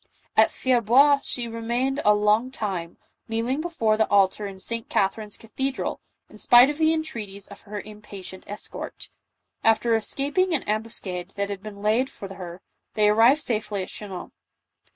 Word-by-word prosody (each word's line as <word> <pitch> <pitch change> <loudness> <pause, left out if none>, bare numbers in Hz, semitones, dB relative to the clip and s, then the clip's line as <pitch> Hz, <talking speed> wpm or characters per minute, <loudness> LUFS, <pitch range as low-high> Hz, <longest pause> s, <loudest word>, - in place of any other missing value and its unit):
At 220 0 +6
Fierbois 260 +3 +4
she 245 -4 -3
remained 240 +5 -1
a 210 - +5
long 210 +4 +2
time, 190 -9 -4 0.3
kneeling 230 +6 -1
before 230 -11 0
the 220 - +2
altar 200 +1 +3
in 195 -1 -8
St. 230 +4 -3
Catherine's 205 +2 -1
cathe 265 +4 -3
dral, - - -3 0.3
in - - -15
spite 245 +2 +7
of 295 - -9
the 315 0 +4
entreaties 225 -12 -4
of 200 - -12
her 210 0 -4
impatient 205 -3 -10
escort. 205 +1 -7 0.5
After 225 +1 +3
escaping 285 - +1
an 285 - -1
ambuscade 200 -4 -4
that 200 0 -2
had 195 -1 -5
been 205 -1 -9
laid 230 +5 +2
for 195 -1 -9
her, 180 -1 -9 0.3
they 210 -1 +4
arrived 235 +8 +5
safely 210 -4 -1
at - - -9
Chinon. 195 -4 -7
220 Hz, 160 wpm, -25 LUFS, 200-250 Hz, 0.5 s, spite